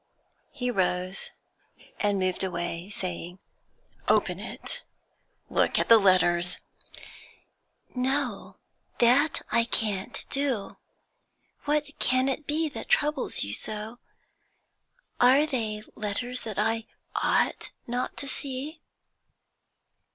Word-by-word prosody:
He 250 -4 -2
rose 185 -2 0 0.7
and 205 -1 +2
moved 185 0 +1
away, 175 0 -3
saying 180 -2 -4 0.7
'Open - - +3
it! - - -5 0.7
Look - - +2
at - - +1
the 230 -1 +10
letters!' 180 -2 +4 1.4
'No, 255 -3 -1 0.4
that 265 +6 +4
I 235 +1 +4
can't 210 -4 -2
do. 265 -8 -1 0.9
What 295 0 +1
can 255 +1 +3
it 275 +2 -2
be 315 +2 +1
that - - -8
troubles 300 - +2
you 100 - -4
so? 215 - -5 1.2
Are 260 +5 +6
they 220 -7 -2
letters 245 +4 -2
that 215 -3 -6
I 225 +2 +1 0.3
ought - - +1 0.2
not 245 +1 -2
to 280 - -2
see?' 280 +4 -3
230 Hz, 100 wpm, -28 LUFS, 195-270 Hz, 1.4 s, the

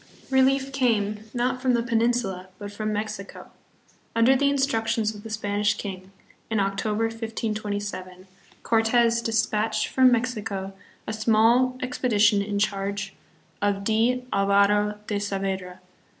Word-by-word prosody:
Relief 265 +1 +3
came, 215 -5 0
not 250 +1 -1
from 255 -2 +2
the 235 - 0
Peninsula, 230 -6 0
but 205 +1 -7
from 215 +1 -3
Mexico. 210 -1 -5 0.6
Under 230 +4 +5
the 280 +2 +3
instructions 225 -6 0
of 210 - -10
the 225 - -9
Spanish 205 -1 0
king, 190 -2 -7 0.4
in 220 -2 0
Octo 195 +2 -1
ber, 225 +1 +1
1527* 205 -4 -4 0.4
Cortes 230 +1 +3
dispatched 220 -1 0
from 260 -1 +5
Mexico 215 -5 -2 0.3
a - - -4
small 230 +4 +3
expedi 250 -3 -1
tion 210 -1 +5
in 205 0 -3
charge 200 -1 -2 0.5
of 200 -1 0
D. 230 +4 +1
Alvaro 200 +1 +3
de 205 -1 -2
Saavedra. 195 -2 -3
215 Hz, 130 wpm, -25 LUFS, 200-235 Hz, 0.6 s, Under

